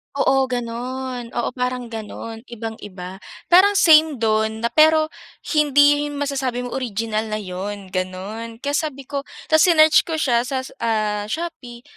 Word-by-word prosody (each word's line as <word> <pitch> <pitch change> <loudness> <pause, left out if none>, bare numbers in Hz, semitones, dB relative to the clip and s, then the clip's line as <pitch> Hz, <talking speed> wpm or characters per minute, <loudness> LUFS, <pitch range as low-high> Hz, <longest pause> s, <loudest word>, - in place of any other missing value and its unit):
Oo, 270 -1 +2
gano'n. 245 0 -4
Oo, 240 - 0
parang 250 -1 -3
gano'n, 225 +1 -7
ibang-iba, 205 -5 -8 0.3
parang 395 +3 +6
same 315 -5 +6
do'n 220 0 0
na 235 - +2
pero 315 0 +4 0.4
hindi 290 -1 +5
'yun 290 - -7
masasabi 270 -3 -2
mo 245 - -6
original 225 -3 -2
na 215 - -3
'yun, 195 0 -6
gano'n. 195 +5 -5
Kaya 285 +1 -1
sabi 295 -3 -3
ko, 280 0 -3 0.3
tas 315 - +6
sinearch 310 -2 +6
ko 325 - -2
siya 240 -6 +2
sas 260 -1 -4
ah, 210 -2 -1
Shopee, 300 -7 -6
245 Hz, 145 wpm, -21 LUFS, 220-290 Hz, 0.4 s, parang